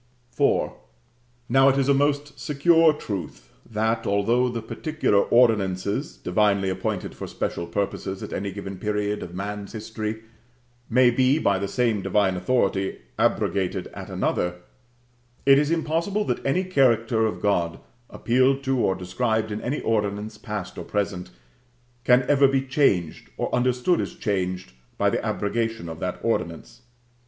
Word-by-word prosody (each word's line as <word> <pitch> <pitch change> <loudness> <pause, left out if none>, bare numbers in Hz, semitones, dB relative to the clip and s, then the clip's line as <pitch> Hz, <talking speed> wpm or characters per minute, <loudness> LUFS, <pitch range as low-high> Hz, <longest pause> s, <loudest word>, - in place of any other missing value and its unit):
IV. - - +2 0.8
Now, 135 +3 +5
it 135 - +2
is 135 -1 +1
a 140 - +5
most 145 0 0
secure 160 +3 +4
truth, 100 - -6 0.2
that, 110 +1 -1
although 115 +5 +2
the 115 -2 -4
particular 155 -6 0
ordinances 100 -5 +2
divinely 100 0 +1
appointed 95 - -3
for - - -7
special 85 - -3
purposes 95 +1 -3
at - - -6
any 100 0 -3
given 95 -1 -7
period 105 0 -1
of 90 0 -8
man's 100 +2 -5
history, 110 0 -5 0.7
may 125 +1 +5
be 130 +3 +3
by 100 -10 +1
the 100 - -2
same 115 -1 0
divine 95 -1 +1
authority 95 0 0 0.2
abrogated 95 -2 0
at - - -8
another, 90 0 -1 0.9
it 135 0 +7
is 150 0 +1
impossible 170 +5 0
that - - -2
any 160 +8 +1
character 115 - +2
of 110 - -4
God, 85 -5 0 0.3
appealed 130 +3 +2
to 135 -1 0
or 95 -5 +2
described 110 +4 -1
in 105 - -4
any 135 +5 -2
ordinance 105 -1 -1
past 105 -2 -6
or - - -5
present, 100 -3 -3 0.7
can 125 0 +5
ever 140 -1 +5
be 135 0 +1
changed, 130 - 0
or - - -3
understood 125 +7 +2
as 175 - -5
changed, 95 - -2 0.3
by - - +2
the - - -1
abrogation 115 -2 -2
of 80 0 -7
that 90 -1 -3
ordinance. 115 +2 -3
110 Hz, 145 wpm, -24 LUFS, 100-130 Hz, 0.9 s, it